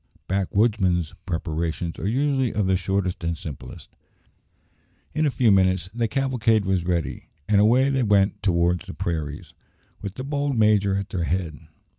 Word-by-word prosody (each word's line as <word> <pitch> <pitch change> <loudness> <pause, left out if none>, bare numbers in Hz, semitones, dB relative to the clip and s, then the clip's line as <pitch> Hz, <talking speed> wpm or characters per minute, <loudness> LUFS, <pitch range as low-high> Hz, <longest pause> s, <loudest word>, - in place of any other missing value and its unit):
Backwoodsmen's 95 -3 +1
preparations 85 -1 -3
are 95 - -2
usually 135 +1 +1
of 105 - 0
the 95 0 +2
shortest 95 -1 -1
and 85 -1 -1
simplest. 75 -5 -9 1.2
In 155 0 +1
a - - +3
few 125 -4 +3
minutes 95 -1 +2
the 115 0 0
cavalcade 115 -5 +1
was 95 -2 +1
ready, 85 -8 -2 0.2
and 105 -1 +4
away 125 +6 +4
they 135 -1 +1
went 100 -3 +2
towards 85 -2 +1
the - - -7
prairies, 75 -4 -4 0.5
with 100 -1 -6
the 130 - -5
bold 140 -1 -1
major 105 -3 +3
at 100 0 -3
their 85 -3 -2
head. 80 -3 -3
95 Hz, 155 wpm, -24 LUFS, 85-115 Hz, 1.2 s, and